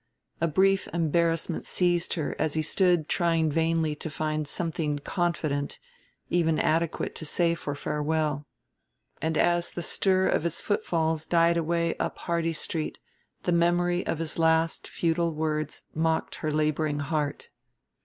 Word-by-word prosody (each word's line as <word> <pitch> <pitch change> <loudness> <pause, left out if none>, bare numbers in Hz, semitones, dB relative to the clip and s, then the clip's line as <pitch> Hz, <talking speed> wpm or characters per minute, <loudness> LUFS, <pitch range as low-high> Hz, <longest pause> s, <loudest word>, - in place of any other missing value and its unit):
A 170 - +3
brief 190 +5 +3
embarrassment 165 0 +1
seized 175 -1 +1
her 155 -4 -2
as 155 0 0
he 155 - +1
stood 175 -1 +2
trying 165 -3 +2
vainly 160 0 +1
to 160 - -5
find 155 0 -2
something 160 -2 -1
confident, 155 -3 -2 0.5
even 165 -3 +2
adequate, 165 +1 0
to - - -7
say 170 +2 +2
for 145 -3 -4
farewell. 150 0 -1 0.7
And 160 0 0
as 175 0 +2
the 175 - -5
stir 190 +1 +2
of - - +2
his 170 0 0
footfalls 160 -5 0
died 170 0 +4
away 170 0 0
up - - -3
Hardy 170 -1 -1
Street 155 0 -2 0.5
the 180 - 0
memory 175 +1 +2
of - - 0
his 165 +1 -2
last 160 0 +2
futile 170 -1 0
words 155 -1 -2
mocked 160 0 0
her 155 - -2
laboring 155 -1 0
heart. 145 -1 -2
165 Hz, 145 wpm, -27 LUFS, 155-170 Hz, 0.7 s, died